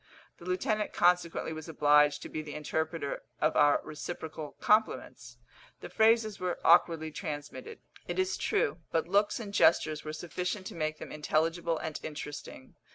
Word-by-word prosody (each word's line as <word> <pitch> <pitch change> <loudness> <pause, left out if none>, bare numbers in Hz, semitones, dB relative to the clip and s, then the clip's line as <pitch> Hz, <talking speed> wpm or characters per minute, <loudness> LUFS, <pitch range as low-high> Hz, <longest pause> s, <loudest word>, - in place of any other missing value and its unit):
The 170 - -12
lieutenant 210 +4 -1
consequently 175 -2 +2
was 155 +1 -8
obliged 150 -1 +4
to - - -7
be 155 - -4
the 150 -1 -8
interpreter 160 0 -3 0.2
of 155 +1 +1
our 145 -1 +5
reciprocal 155 -1 -7
compliments. 215 +1 0 0.4
The - - -7
phrases 220 -1 +3
were 180 -1 -2
awkwardly 165 -2 +4
transmitted, 155 - -7 0.3
it - - -3
is 375 0 +1
true; 405 - 0
but 165 0 0
looks 205 +5 +2
and 205 -3 -7
gestures 155 -6 +3
were 155 - -5
sufficient 180 +4 -4
to - - -6
make 155 -2 -2
them - - -9
intelligible 165 +2 0
and 160 -1 -5
interesting. 145 -3 -8
160 Hz, 155 wpm, -30 LUFS, 155-185 Hz, 0.4 s, our